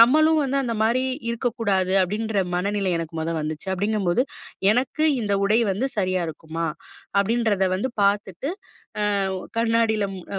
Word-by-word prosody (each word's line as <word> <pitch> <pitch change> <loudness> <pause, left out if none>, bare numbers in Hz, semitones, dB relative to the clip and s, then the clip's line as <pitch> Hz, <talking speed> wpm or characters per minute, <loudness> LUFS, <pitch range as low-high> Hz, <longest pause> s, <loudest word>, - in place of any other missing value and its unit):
"நம்மளும் 310 +6 +6
வந்து 275 0 -1
அந்த 235 -2 -2
மாரி 240 +4 +2 0.3
இருக்கக்கூடாது." 225 -6 0
அப்பிடின்ற 210 +2 0
மனநிலை 200 +1 0
எனக்கு 165 -1 -5
முத 160 +1 -2
வந்துச்சு. 155 +4 -5
அப்பிடிங்கம்போது, 205 +2 +1 0.5
"எனக்கு 260 +6 0 0.2
இந்த 205 -3 -1
உடை 215 +4 +3
வந்து 235 +8 -1
சரியா 185 -2 +1
இருக்குமா?" 160 +1 -4 0.5
அப்பிடின்றத 210 -2 +1
வந்து 260 +8 -2
பார்த்துட்டு 200 - 0 0.8
அ - - -2 0.3
கண்ணாடியில 225 -2 +2
ம் 185 - -9
210 Hz, 135 wpm, -24 LUFS, 185-235 Hz, 0.8 s, நம்மளும்